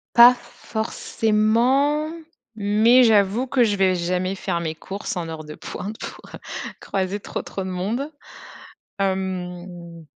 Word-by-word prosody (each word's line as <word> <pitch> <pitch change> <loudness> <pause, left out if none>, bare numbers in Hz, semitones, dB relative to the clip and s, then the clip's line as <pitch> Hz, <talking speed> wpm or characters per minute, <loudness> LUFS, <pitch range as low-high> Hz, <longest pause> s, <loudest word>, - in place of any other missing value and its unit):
Pas 240 +1 +10
forcément 235 +7 +1 0.5
mais 215 +4 +5
j'avoue 220 +2 +3
que 250 -2 +4
je 210 -3 +2
vais 190 -2 +3
jamais 180 +2 -1
faire 185 -3 -2
mes 160 -2 -3
courses 200 +5 -5
en 170 -2 -3
heure 160 -1 -6
de 150 0 -9
pointe 210 +3 -6
pour, - - -8
heu, - - -10 0.4
croiser 190 +1 -2
trop, - - -5
trop 195 - -5
de - - -4
monde. 215 +11 -2 0.9
Hem 180 -3 -3
195 Hz, 135 wpm, -23 LUFS, 180-225 Hz, 0.9 s, Pas